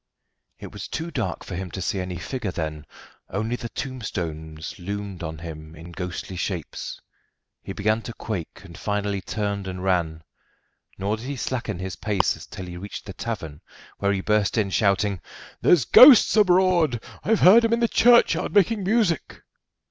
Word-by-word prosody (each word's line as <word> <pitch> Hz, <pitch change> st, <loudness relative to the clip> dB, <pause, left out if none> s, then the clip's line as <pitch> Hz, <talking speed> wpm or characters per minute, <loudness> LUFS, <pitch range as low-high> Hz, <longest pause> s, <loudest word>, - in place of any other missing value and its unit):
It -, -, -10 dB
was -, -, -7 dB
too 165 Hz, +2 st, -4 dB
dark 125 Hz, -8 st, -3 dB
for -, -, -7 dB
him 95 Hz, +1 st, -5 dB
to 95 Hz, -, -6 dB
see 95 Hz, +2 st, -2 dB
any 90 Hz, -1 st, -4 dB
figure 105 Hz, +5 st, -4 dB
then, 80 Hz, -3 st, -5 dB, 0.4 s
only 110 Hz, +5 st, -2 dB
the 120 Hz, -1 st, -6 dB
tombstones 85 Hz, -, -5 dB
loomed 100 Hz, 0 st, -5 dB
on 80 Hz, -2 st, -5 dB
him 80 Hz, -1 st, -9 dB
in 85 Hz, +2 st, -11 dB
ghostly 90 Hz, +1 st, -6 dB
shapes. 90 Hz, -3 st, -4 dB, 0.6 s
He -, -, -7 dB
began 110 Hz, +3 st, 0 dB
to 115 Hz, -, -7 dB
quake, 100 Hz, -8 st, -5 dB
and -, -, -12 dB
finally 105 Hz, -1 st, -2 dB
turned 100 Hz, -1 st, -3 dB
and 90 Hz, -1 st, -5 dB
ran, 85 Hz, -4 st, 0 dB, 0.7 s
nor 100 Hz, +3 st, -1 dB
did 115 Hz, +4 st, -8 dB
he 140 Hz, -, -3 dB
slacken 120 Hz, -6 st, -3 dB
his 95 Hz, -1 st, -5 dB
pace 105 Hz, -1 st, -1 dB
till 95 Hz, -, -7 dB
he 90 Hz, -1 st, -8 dB
reached 100 Hz, +3 st, -8 dB
the 95 Hz, -, -7 dB
tavern, 80 Hz, -9 st, -6 dB, 0.4 s
where 100 Hz, 0 st, +1 dB
he 95 Hz, -1 st, -1 dB
burst 105 Hz, +1 st, +1 dB
in 100 Hz, -3 st, +1 dB
shouting: 100 Hz, -2 st, +1 dB, 0.4 s
"There's 160 Hz, -9 st, +4 dB
ghosts 250 Hz, -, +8 dB
abroad. 180 Hz, -, +4 dB, 0.2 s
I've 220 Hz, 0 st, +2 dB
heard 215 Hz, +6 st, +8 dB
'em 230 Hz, -, +1 dB
in 230 Hz, -, +2 dB
the 235 Hz, -, +3 dB
churchyard 240 Hz, -2 st, +4 dB
making 205 Hz, +1 st, +3 dB
music." 195 Hz, -, 0 dB
100 Hz, 170 wpm, -24 LUFS, 90-130 Hz, 0.7 s, ghosts